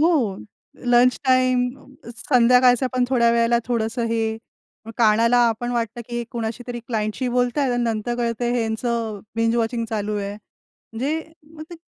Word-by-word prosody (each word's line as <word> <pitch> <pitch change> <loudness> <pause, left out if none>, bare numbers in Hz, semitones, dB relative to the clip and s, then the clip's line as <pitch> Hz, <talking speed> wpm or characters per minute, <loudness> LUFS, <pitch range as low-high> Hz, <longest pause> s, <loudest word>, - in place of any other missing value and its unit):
हो. 290 - +2 0.5
Lunch 245 +1 +4
time, 255 -1 +3 0.4
अ, 235 - -9
संध्याकाळचा 250 0 +4
पण 255 -1 +1
थोड्या 235 -3 +3
वेळेला 235 0 +3
थोडंसं 230 0 -1
हे, 225 -1 -1 0.6
कानाला 230 +1 +4
आपण 240 +2 -3 0.2
की - - -5 0.2
हे 240 - -1
कोणाशी 230 0 -4
तरी 240 -1 -5
क्लायंटशी 220 +2 -2
बोलताय 250 +2 +1
आणि 245 0 0
नंतर 230 +1 -1
कळतं 240 0 -1
हेंच 225 -2 -1 0.6
बिंज 230 +1 +1
वॉचिंग 230 0 -1
चालू 210 -1 -2
आहे. 200 0 -3
म्हणजे, 260 +7 -6 0.3
मग 310 - -9
ते - - -7
240 Hz, 145 wpm, -22 LUFS, 225-250 Hz, 0.6 s, Lunch